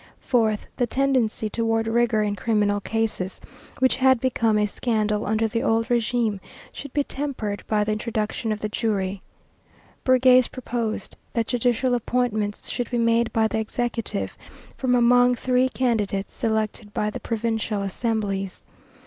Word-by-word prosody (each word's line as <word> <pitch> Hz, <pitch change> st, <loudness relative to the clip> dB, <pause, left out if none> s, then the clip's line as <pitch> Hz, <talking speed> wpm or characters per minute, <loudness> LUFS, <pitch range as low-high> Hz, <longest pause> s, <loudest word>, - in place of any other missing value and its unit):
Fourth, 220 Hz, -4 st, +1 dB
the 245 Hz, -, +1 dB
tendency 255 Hz, -4 st, +1 dB
toward 225 Hz, +1 st, 0 dB
rigor 230 Hz, -1 st, +2 dB
in 205 Hz, -1 st, -1 dB
criminal 205 Hz, -1 st, +1 dB
cases, 215 Hz, -3 st, -2 dB, 0.4 s
which 260 Hz, 0 st, +3 dB
had 260 Hz, -1 st, +4 dB
become 230 Hz, -4 st, +1 dB
a 210 Hz, -, +3 dB
scandal 215 Hz, -1 st, -1 dB
under 220 Hz, +1 st, +1 dB
the 230 Hz, +1 st, -1 dB
old 225 Hz, 0 st, +2 dB
régime, 235 Hz, -3 st, +1 dB, 0.3 s
should 285 Hz, -, -8 dB
be 290 Hz, -, +1 dB
tempered 260 Hz, -9 st, -4 dB
by 210 Hz, -1 st, +2 dB
the 210 Hz, -, -1 dB
introduction 215 Hz, 0 st, -2 dB
of 215 Hz, -, -3 dB
the 215 Hz, -, -1 dB
jury. 200 Hz, -3 st, -1 dB, 0.8 s
Bergasse 255 Hz, -1 st, +5 dB
proposed 230 Hz, -5 st, -4 dB, 0.2 s
that 230 Hz, -1 st, +1 dB
judicial 245 Hz, +1 st, +1 dB
appointments 230 Hz, -3 st, -1 dB
should 245 Hz, -, -3 dB
be 245 Hz, -, -1 dB
made 230 Hz, 0 st, +2 dB
by 220 Hz, -1 st, +2 dB
the 220 Hz, -, -2 dB
executive 225 Hz, -, -3 dB, 0.4 s
from 255 Hz, -1 st, +1 dB
among 245 Hz, +1 st, +5 dB
three 255 Hz, +1 st, +2 dB
candidates 210 Hz, -7 st, -1 dB
selected 215 Hz, -1 st, -2 dB
by 210 Hz, 0 st, 0 dB
the -, -, -6 dB
provincial 225 Hz, -2 st, -2 dB
assemblies. 195 Hz, -2 st, -2 dB
225 Hz, 145 wpm, -24 LUFS, 210-245 Hz, 0.8 s, Bergasse